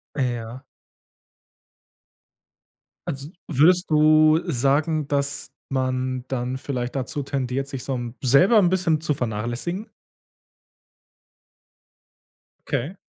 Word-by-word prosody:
Äh 130 -4 0
ja. 120 +4 -8 2.4
Also, 140 +2 -4 0.2
würdest 165 +4 +3
du 155 +1 +5
sagen, 145 +3 +1
dass 140 0 -2 0.2
man 130 -1 -1
dann 130 0 -3
vielleicht 125 -1 -4
dazu 135 +3 -3
tendiert, 135 -1 -2
sich 135 -2 -6
so 135 - -3
'n 120 -1 -5
selber 160 - +5
'n 190 -4 +5
bisschen 170 -4 +1
zu 155 -2 0
vernachlässigen? 120 - -3 2.8
Okay. 145 +6 -2
140 Hz, 95 wpm, -23 LUFS, 125-155 Hz, 2.8 s, du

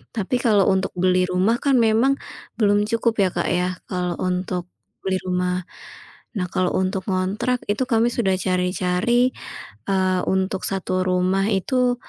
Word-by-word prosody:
Tapi 220 +3 0
kalau 215 -5 +3
untuk 190 0 0
beli 185 0 +2
rumah 185 +6 +2
kan 275 -2 +2
memang 230 +5 +3 0.4
belum 205 -1 +3
cukup 230 0 0
ya, 195 - +4
Kak, 175 - -1
ya 180 +1 +1 0.2
kalau 180 -2 -1
untuk 180 -1 -2 0.4
beli 190 -1 +1
rumah. 180 0 -1 0.7
Nah, 180 -2 -1
kalau 185 -1 0
untuk 190 0 -1
ngontrak, 195 +7 -1
itu 210 +5 +1
kami 230 -1 +3
sudah 195 -6 +1
cari-cari, 185 +6 +1 0.6
eee, 185 -1 +2
untuk 190 0 0
1 185 -1 -1
rumah 185 +1 +1
itu 245 +6 +1
190 Hz, 145 wpm, -22 LUFS, 180-220 Hz, 0.7 s, ya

